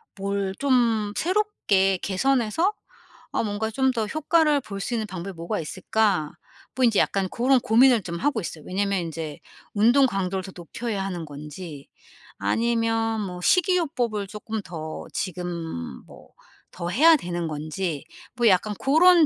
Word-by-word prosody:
뭘 200 -1 -2
좀 235 -6 +2
새롭게 325 - +2
개선해서 270 - +1 0.6
아 - - 0
뭔가 215 +1 -2
좀 265 +3 +2
더 225 -4 -1
효과를 310 +1 +2
볼 200 -3 -7
수 240 - -3
있는 220 -2 -2
방법이 190 0 -6
뭐가 170 +1 -3
있을까?' 185 -1 0 0.4
뭐 260 - +1
인제 225 -4 +3
약간 195 -2 +1
고런 255 +2 +3
고민을 235 +1 +5
좀 170 -1 -4
하고 285 -3 0
있어요. 160 -3 -7
왜냐면 195 +1 0
인제 160 -3 -5 0.3
운동 240 +6 +5
강도를 190 -3 -2
더 190 - -8
높여야 195 +4 -4
하는 175 -4 -4
건지. 150 +1 -9 0.5
아니면 225 -1 +1
뭐 180 -3 -5
식이요법을 280 - +1
조금 215 +1 -5
더 160 -3 -6
지금 170 - -4
뭐 - - -16 0.4
더 175 -1 -5
해야 315 - +6
되는 175 - -3
건지 155 +1 -3 0.3
뭐 240 -2 +3
약간 200 +3 +2
고런 335 +4 +6
205 Hz, 280 characters per minute, -25 LUFS, 180-245 Hz, 0.6 s, 해야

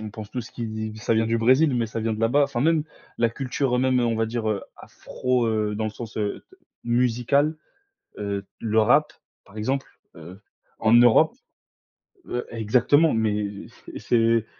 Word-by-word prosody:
On 110 - -6
pense 110 -1 -9
tout 125 - -4
ce 115 - -11
qui 110 -2 -5
ça 115 - 0
vient 110 0 +2
du 115 +1 +1
Brésil, 130 +5 +3
mais 120 -2 0
ça 115 +1 -6
vient 115 0 -1
de 110 - -7
là-bas, 125 +6 +3
enfin 120 -3 -3
même 160 +2 +2 0.3
la 115 - +3
culture 130 +1 -2
même, 130 -1 +2
heu, 120 - +2
on 115 - 0
va 115 0 0
dire, 115 -1 -3
heu, 105 -2 -1
afro, 125 -2 -2
heu, 105 -1 -1
dans 110 - -3
le 110 - -2
sens, 115 +1 -9
heu, 105 -2 -3
d - - -18 0.3
musical, 125 +5 +1 0.6
heu, 100 -1 -3 0.2
le 110 0 +1
rap, 125 +8 +3 0.3
par 100 - -19
exemple, 135 +6 -1 0.3
heu, 85 +5 -12 0.4
en 110 0 +3
Europe, 120 - +5 0.9
heu, 125 - -3
exactement, 125 +8 +2
mais 105 -2 0 0.4
pff, - - -10
c'est 115 -1 +2
115 Hz, 185 wpm, -24 LUFS, 110-125 Hz, 0.9 s, Europe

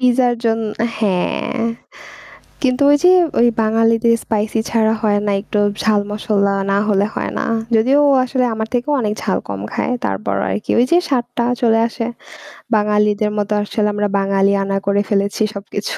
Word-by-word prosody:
পিজ্জার 250 -1 +3
জন 225 0 +1 0.4
হ্যাঁ, 200 +4 -1 1.0
কিন্তু 255 +1 +1
ওই 290 - +6
যে 360 - +7 0.3
ওই 240 - +5 0.2
বাঙালিদের 225 +1 +2
স্পাইসি 220 +1 -1
ছাড়া 220 -1 +2
হয় 205 -1 +2
না 205 - +1
একটু 210 0 -3 0.2
ঝাল 215 -2 +2
মশলা 205 -2 0 0.2
না 200 - +2
হলে 200 0 +2
হয় - - -3
না। - - -2 0.3
যদিও 260 +6 +3
ও - - +4
আসলে 255 0 -1
আমার 220 0 -3
থেকেও 250 +5 0
অনেক 210 -3 -1
ঝাল 195 - 0
কম 100 -1 -5
খায়। 250 - -1
তারপরও 100 0 -2
আরকি 100 +2 -3
ওই 245 - +5
যে 345 - +5
স্বাদটা 245 -2 -1 0.2
চলে 225 -1 +3
আসে। 230 -1 -4 0.7
বাঙালিদের 210 0 +1
মতো 205 0 -1
আসলে 210 0 -1
আমরা 205 0 0
বাঙালি 195 0 +2
আনা 195 0 -1
করে 200 0 +2
ফেলেছি 200 +1 0
সবকিছু 200 +1 -5
215 Hz, 165 wpm, -17 LUFS, 200-235 Hz, 1.0 s, যে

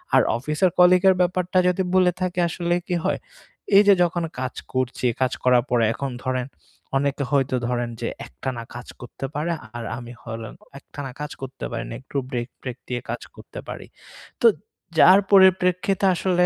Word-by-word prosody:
আর - - +7 0.2
অফিসের 150 +8 +1
কলিগের 180 +1 +6
ব্যাপারটা 180 +1 0
যদি 180 +1 +1
বলে 185 -1 +5
থাকি 180 -1 -1
আসলে 175 0 -1
কি 180 - 0
হয়? - - 0 0.6
এইযে 205 0 +7
যে - - +1
যখন 175 0 0 0.2
কাজ 130 0 -3 0.2
করছি, 130 0 -1 0.2
কাজ 130 0 +2
করার 125 -2 +4
পরে 120 -2 +2
এখন 135 +1 -4
ধরেন 130 0 -1 0.5
অনেকে 140 0 0
হয়তো 135 -2 +2
ধরেন 120 -1 -1
যে 115 - -1 0.2
একটানা 125 -3 -5
কাজ 125 - -8
করতে 125 +2 -7
পারে 160 +3 -1 0.2
আর 120 - -4
আমি 120 0 -9 0.7
একটানা 140 -2 -8
কাজ 150 - -4
করতে 135 0 -6
পারি 115 0 -3
না। - - -6
একটু 140 - -6
ব্রেক-প্রেক 120 0 -5
দিয়ে 120 -1 -3
কাজ - - -3
করতে - - -10
পারি। - - -7 0.5
তো - - +7 0.5
যার 190 +2 +8
পরিপ্রেক্ষিতে 190 0 +4
আসলে 180 0 +2
145 Hz, 165 wpm, -23 LUFS, 125-180 Hz, 0.7 s, যার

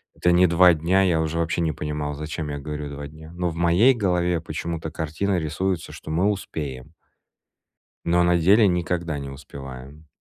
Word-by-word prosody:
это 90 - +2
не 90 +1 +6
два 90 +1 +6
дня, 85 +5 +2
я 85 -4 +2
уже 80 +1 -2
вообще 85 +1 0
не 80 -2 +1
понимал, 75 0 -4
зачем 75 +1 -5
я 70 0 -4
говорю 75 +1 -5
"два 70 0 -7
дня". 80 +2 -13
Но 90 0 -1
в 80 - -7
моей 85 +10 +4
голове 90 -5 +1
почему-то 80 0 -5
картина 85 +4 -1
рисуется, 85 +3 -2
что 80 - -8
мы 90 +6 +2
успеем. 75 -10 -5 1.1
Но 85 +1 +3
на 85 0 +3
деле 100 +6 +5
никогда 85 -3 -1
не 70 -1 -6
успеваем. 70 +1 -10
80 Hz, 175 wpm, -24 LUFS, 75-90 Hz, 1.1 s, не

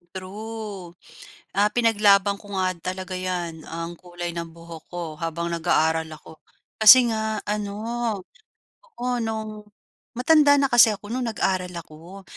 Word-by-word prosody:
True. 200 -1 -7 0.6
Ah, 205 +2 +3
pinaglaban 205 -4 +3
ko 205 0 -14
nga 185 0 0 0.2
talaga 185 0 -6
'yan, 175 -3 -4
ang 165 +1 -6
kulay 175 0 -7
ng 170 -1 -5
buhok 165 -1 -11
ko 175 -1 -4
habang 165 +1 -3
nag-aaral 160 -1 +1
ako. 155 +1 -12 0.4
Kasi 240 +3 +8
nga 220 -1 -1
ano, 205 -1 -2 1.2
oo, 245 0 -2
no'ng 215 -2 -5 0.5
matanda 290 +3 +5
na 275 -1 +1
kasi 230 -3 +6
ako 205 +2 -11
no'ng 250 0 -2
nag-aral 185 -2 -1
ako. 170 +4 -11
195 Hz, 130 wpm, -24 LUFS, 170-220 Hz, 1.2 s, Kasi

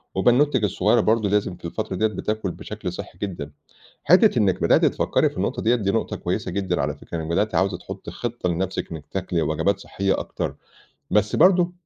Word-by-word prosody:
وبنّوتتِك 125 +4 +3
الصغيرة 105 +4 +2
برضه 110 -1 +2
لازم 100 -3 0
في 85 - -13
الفترة 95 +2 -3
ديَّة 110 +4 +2
بتاكل 105 -2 -3
بشكل 105 -2 -6
صحّي 90 -2 -8
جدًا، 85 -7 -4 0.5
حتّة 180 - +5
إنِّك 95 -4 +2
بدأتِ - - +4
تفكّري - - +2
في - - -16
النقطة - - -2
ديَّة 115 +3 +3
دي 100 -5 0
نقطة - - -1
كويسة - - -3
جدًا 95 -3 -1
على - - -1
فكرة، 85 - -7
إنِّك 80 - -4
بدأتِ 95 +6 0
عاوزة 95 +1 +2
تحطّي - - -8
خطّة 120 -6 -3
لنفسِك 95 +2 -2
إنِّك 75 -3 -8
تاكلي 90 -3 -1
وجبات 80 +6 0
صحيّة 95 0 -1
أكتر، - - -4 0.5
بس 105 +1 +2
برضه 180 -1 +5
100 Hz, 185 wpm, -23 LUFS, 90-110 Hz, 0.5 s, حتّة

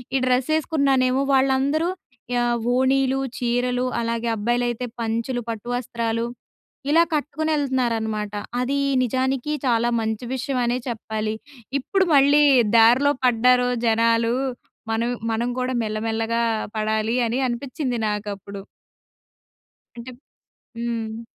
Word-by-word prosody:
ఈ - - +5
డ్రెస్ 255 +2 +1
యేసుకున్నానేమో! 275 -4 +2
వాళ్ళందరూ 270 +5 +2 0.5
ఆహ్, 240 0 +1 0.2
ఓణీలు, 265 +1 +2 0.2
చీరలు 245 +1 0
అలాగే 230 0 -2
అబ్బాయిలైతే 240 +2 -1
పంచలు, 230 +2 -2
పట్టు 225 +1 -5
వస్త్రాలు 230 -1 -2 0.6
ఇలా 330 +3 +5
కట్టుకొనెళ్తున్నారనమాట. 260 -8 -1 0.3
అది 265 +3 0 0.3
నిజానికి 260 +4 -1
చాలా 235 -1 +2
మంచి 220 +1 -3
విషయం 260 0 -2
అనే 240 +1 0
చెప్పాలి. 220 -2 -3 0.6
ఇప్పుడు 385 -1 +3
మళ్ళీ 285 +2 +5 0.3
దారిలో 245 +6 +5
పడ్డారు 250 +1 +4 0.2
జనాలు. 230 +1 +2 0.6
మనం 230 +2 0 0.2
మనం 235 +2 -1
గూడా 255 0 -1
మెల్లమెల్లగా 225 +2 -1 0.4
పడాలి 220 +1 0
అని 235 +3 -1
అనిపిచ్చింది 250 0 -3
నాకప్పుడు. 200 -1 -5 1.3
అంటే 235 +2 -8 0.7
హ్మ్. 230 -1 -3
240 Hz, 100 wpm, -23 LUFS, 225-265 Hz, 1.3 s, ఈ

